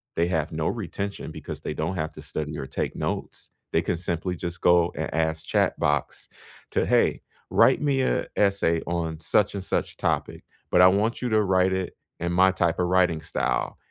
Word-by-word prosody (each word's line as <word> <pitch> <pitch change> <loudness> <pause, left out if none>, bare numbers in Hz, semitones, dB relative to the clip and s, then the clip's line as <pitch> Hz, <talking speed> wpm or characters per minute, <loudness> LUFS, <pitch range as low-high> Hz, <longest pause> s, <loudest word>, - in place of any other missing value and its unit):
They 85 +1 +2
have 80 -3 -1
no 80 -1 -2
retention 100 -1 -4
because - - -7
they - - -4
don't 80 +5 -2
have 80 -3 -3
to 75 - -10
study 75 0 -4
or - - -4
take 65 - -3
notes. - - -4 0.2
They 80 - +3
can 85 +1 -1
simply 90 +1 -2
just 85 +1 -6
go 85 -1 +4
and - - -4
ask 80 0 -1
Chatbox 75 0 0 0.4
to, - - +1
"Hey, - - +2 0.3
write 130 - +4
me 140 -2 +1
a 130 - 0
essay 100 -5 +2
on 80 -2 -2
such 100 +6 +2
and 100 - -4
such - - -2
topic, - - -2 0.3
but 90 - +5
I 90 - +9
want 105 +5 +1
you 125 - -1
to 110 -1 +3
write 95 -1 +2
it 95 -1 -3 0.2
in 85 +1 -2
my 95 +2 +5
type 85 -2 0
of 90 - +2
writing 90 -3 +2
style." - - -2
90 Hz, 195 wpm, -25 LUFS, 80-95 Hz, 0.4 s, I